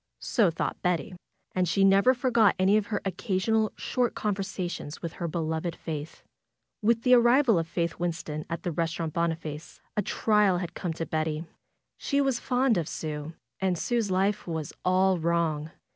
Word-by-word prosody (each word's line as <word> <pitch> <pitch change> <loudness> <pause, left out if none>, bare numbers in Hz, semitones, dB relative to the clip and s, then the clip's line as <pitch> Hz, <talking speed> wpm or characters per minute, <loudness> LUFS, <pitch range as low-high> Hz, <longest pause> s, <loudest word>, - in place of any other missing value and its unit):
So 220 -8 +3
thought 165 - -3
Betty. 180 +2 0 0.4
And 180 -2 +1
she 195 +3 +2
never 195 +6 +5
forgot 235 -4 +3
any 190 +2 +4
of 215 -1 +1
her 205 - -2
occasional 215 +2 0
short 250 -2 -1
conversations 190 -6 -3
with 165 -1 -4
her 175 - -4
beloved 160 +1 -2
Faith. 155 -1 -6 0.6
With 230 +1 +2
the 250 - +5
arrival 240 -3 +5
of 165 - -2
Faith 170 0 -2
Winston 160 -3 -3
at 170 +3 -4
the 175 - -1
Restaurant 165 -1 -2
Boniface 165 -2 -3 0.2
a 210 - +2
trial 210 -2 +2
had 175 -2 -4
come 175 -3 -3
to 165 +1 -4
Betty. 155 0 -2 0.5
She 280 - 0
was 270 -4 +1
fond 250 -5 +2
of 165 - -3
Sue, 155 0 -5 0.2
and 185 -2 +1
Sue's 230 +2 0
life 190 +2 0
was 160 -3 -4
all 185 0 +3
wrong. 160 -2 0
180 Hz, 165 wpm, -27 LUFS, 165-210 Hz, 0.6 s, never